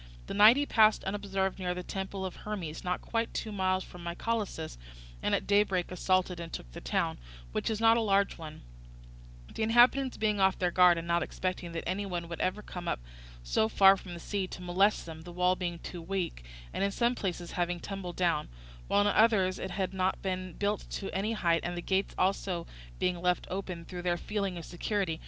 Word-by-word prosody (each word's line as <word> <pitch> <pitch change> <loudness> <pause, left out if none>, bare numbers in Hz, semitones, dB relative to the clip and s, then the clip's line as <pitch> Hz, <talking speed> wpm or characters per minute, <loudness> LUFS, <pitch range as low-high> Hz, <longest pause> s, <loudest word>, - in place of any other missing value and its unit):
The - - -5
night 215 +5 +8
he 290 - +1
passed 220 -5 +4
unobserved 195 -1 -2
near 180 -1 -1
the 180 - -5
temple 190 +1 -4
of 185 - -6
Hermes, 185 -7 -5
not 180 0 -1
quite 230 0 -1
two 220 - -3
miles 185 -2 +1
from 175 -1 -11
Mycalessus, 170 - -3 0.4
and - - +2
at - - -2
daybreak 200 -3 +2
assaulted 185 -1 +1
and 170 -1 -6
took - - -7
the - - -9
town, - - -1 0.3
which - - -1
is 220 -1 -1
not 225 0 +6
a - - +2
large 200 -2 +2
one; 155 -2 -9 0.9
the - - -5
inhabitants 245 +4 +4
being 210 -2 +1
off 190 0 +4
their 180 -1 +1
guard 180 -1 +6
and 165 0 -4
not 170 0 +2
expecting 180 +1 -3
that 165 - -4
any 200 +2 -1
one 175 -2 -3
would 170 - -5
ever 200 +3 -1
come 175 -1 -7
up - - 0 0.4
so - - +1
far 195 - +7
from 180 -2 -8
the - - -8
sea 195 +2 -2
to 180 - -8
molest 190 +4 +2
them, 160 -1 -8
the 175 +2 -10
wall 180 +1 +2
too - - -16
being 175 -1 -5
weak, 185 - -2 0.3
and - - -1
in 200 - +2
some 235 +4 +1
places 175 -6 -4
having 175 0 -1
tumbled 190 -2 -6
down, 170 -4 +1 0.4
while 200 - +3
in - - +2
others 205 -3 +4
it 190 - -4
had 190 0 -2
not 190 0 0
been 185 -2 -3
built 205 +3 -1
to 195 - -5
any 205 +4 0
height, 170 -6 +2
and 175 0 -3
the - - -1
gates 190 +2 0
also 185 -2 0 0.3
being 180 -1 0
left 180 0 +1
open 180 -3 -4
through 180 0 -6
their 175 -1 0
feeling 200 -2 -2
of 165 - -7
security. 180 -2 -2
185 Hz, 210 wpm, -30 LUFS, 175-200 Hz, 0.9 s, night